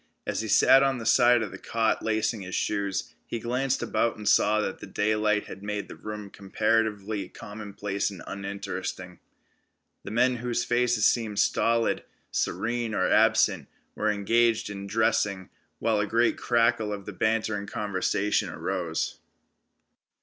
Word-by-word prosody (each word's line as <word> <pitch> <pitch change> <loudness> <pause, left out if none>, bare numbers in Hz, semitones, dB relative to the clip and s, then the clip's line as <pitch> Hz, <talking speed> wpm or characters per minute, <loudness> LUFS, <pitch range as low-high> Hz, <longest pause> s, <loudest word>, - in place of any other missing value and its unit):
As - - -2
he - - -4
sat 135 - +6
on 135 -1 +2
the 115 - -7
side 120 0 +5
of 105 - -5
the - - -9
cot 115 -1 0
lacing 110 0 0
his 95 -1 -5
shoes, 100 -2 -2
he - - -3
glanced 125 +3 -1
about 115 -1 0
and 105 -1 -6
saw 105 +1 +4
that 105 - -5
daylight 105 0 +1
had 95 - -10
made 105 0 -4
the - - -10
room 105 -2 -7
comparatively 105 -1 -1
commonplace 105 -1 -4
and 100 -4 -10
uninteresting. 100 -2 -5 0.8
The - - -7
men, 125 +3 +2
whose 120 0 -1
faces 120 -2 +2
seemed 110 -4 +1
stolid, 115 +2 +2 0.3
serene 115 -1 -1
or 95 - +2
absent, 105 -7 +3 0.3
were 110 - 0
engaged 110 +2 +2
in 100 0 -6
dressing, 100 -3 0 0.3
while 110 -2 +1
a 105 - 0
great 115 +3 +2
crackle 115 -2 +1
of 100 -2 -5
bantering 110 -2 0
conversation 100 0 0
arose. 85 -4 -3
105 Hz, 140 wpm, -27 LUFS, 100-115 Hz, 0.8 s, sat